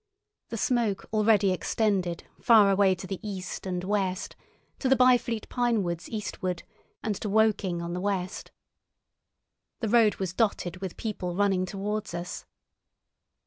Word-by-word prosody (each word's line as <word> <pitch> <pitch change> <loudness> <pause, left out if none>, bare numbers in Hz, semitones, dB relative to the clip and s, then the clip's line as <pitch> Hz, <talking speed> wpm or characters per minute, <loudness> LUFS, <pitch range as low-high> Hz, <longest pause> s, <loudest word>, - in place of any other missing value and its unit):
The 230 - -4
smoke 225 -4 0
already 210 -2 +4
extended 185 -2 0 0.2
far 215 -4 +6
away 195 -1 +4
to 190 - -8
the 190 0 -5
east 195 -3 -5
and 180 -1 -2
west—to 195 +6 -3
the 265 - +6
Byfleet 245 -3 +3
pine 240 -4 +1
woods 170 -1 -4
eastward, 185 -4 -3 0.4
and 215 - 0
to 210 - -4
Woking 200 -5 +2
on 170 0 -4
the 180 - -3
west. 195 -2 -2 1.3
The 225 - -1
road 225 -2 +5
was 185 -3 -3
dotted 190 -5 0
with 185 -1 -6
people 185 -5 -3
running 190 -2 +2
towards 205 0 -3
us. 175 +1 -6
200 Hz, 140 wpm, -28 LUFS, 185-220 Hz, 1.3 s, far